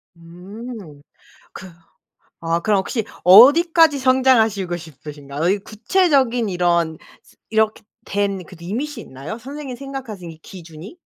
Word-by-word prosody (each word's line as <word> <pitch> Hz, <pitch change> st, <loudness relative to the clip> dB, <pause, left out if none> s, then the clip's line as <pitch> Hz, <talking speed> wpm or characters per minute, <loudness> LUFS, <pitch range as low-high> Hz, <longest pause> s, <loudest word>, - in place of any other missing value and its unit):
음 180 Hz, 0 st, -11 dB, 0.5 s
그 190 Hz, -, -10 dB, 0.7 s
아 165 Hz, 0 st, -1 dB
그럼 210 Hz, +1 st, +2 dB
혹시 220 Hz, +4 st, -3 dB, 0.2 s
어디까지 290 Hz, -, +7 dB
성장하시고 225 Hz, -8 st, +2 dB
싶으신가요? 150 Hz, 0 st, -6 dB
이 200 Hz, -, +2 dB
구체적인 245 Hz, -, +1 dB
이런 170 Hz, -3 st, 0 dB, 0.5 s
이렇게 220 Hz, 0 st, 0 dB, 0.2 s
된 200 Hz, -2 st, -2 dB
그 185 Hz, -, -14 dB
limit이 245 Hz, -, -5 dB
있나요? 140 Hz, -, -8 dB
선생님 270 Hz, +2 st, -8 dB
생각하신 245 Hz, -10 st, -8 dB
이 160 Hz, -, -14 dB
기준이? 165 Hz, -, -12 dB
205 Hz, 285 characters per minute, -20 LUFS, 170-255 Hz, 0.7 s, 어디까지